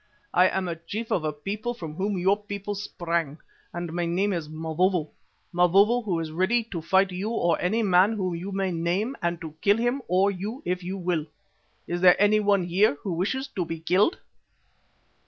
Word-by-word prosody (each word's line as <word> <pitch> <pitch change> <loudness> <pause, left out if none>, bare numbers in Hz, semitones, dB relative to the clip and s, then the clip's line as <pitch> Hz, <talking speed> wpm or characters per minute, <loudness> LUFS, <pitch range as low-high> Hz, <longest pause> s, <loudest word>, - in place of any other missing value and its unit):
"I 180 +1 +6
am 190 0 -1
a 170 - -3
chief 200 +8 -6
of 165 - +1
a 155 - 0
people 205 - -4
from 160 -8 -7
whom 195 +4 -2
your 190 +3 +3
people 205 0 -6
sprang 170 -6 -3 0.3
and 175 -1 -5
my 175 0 -1
name 190 +4 +1
is 165 -4 -4
Mavovo, 160 +1 0 0.4
Mavovo 195 +7 +4
who 190 -6 -1
is 160 -1 -4
ready 190 +8 +1
to 170 -4 -3
fight 190 +4 +2
you 190 +4 -3
or 175 -7 +1
any 220 +6 +1
man 190 +2 +4
whom 185 -4 -2
you 180 +4 -5
may 195 -1 -1
name, 180 +9 -1
and 170 -1 -1
to 160 -3 -7
kill 200 +1 +4
him 240 +4 0
or 190 +3 +3
you 205 +7 -6
if 180 +1 -1
you 185 +2 -4
will. 175 -4 -1 0.6
Is 175 0 -3
there 180 -1 +7 0.3
one 200 -2 +3
here 180 0 +2
who 190 - -2
wishes 240 +11 -1
to 185 - -2
be 165 -1 -5
killed?" 185 - +2
185 Hz, 195 wpm, -26 LUFS, 170-205 Hz, 0.6 s, there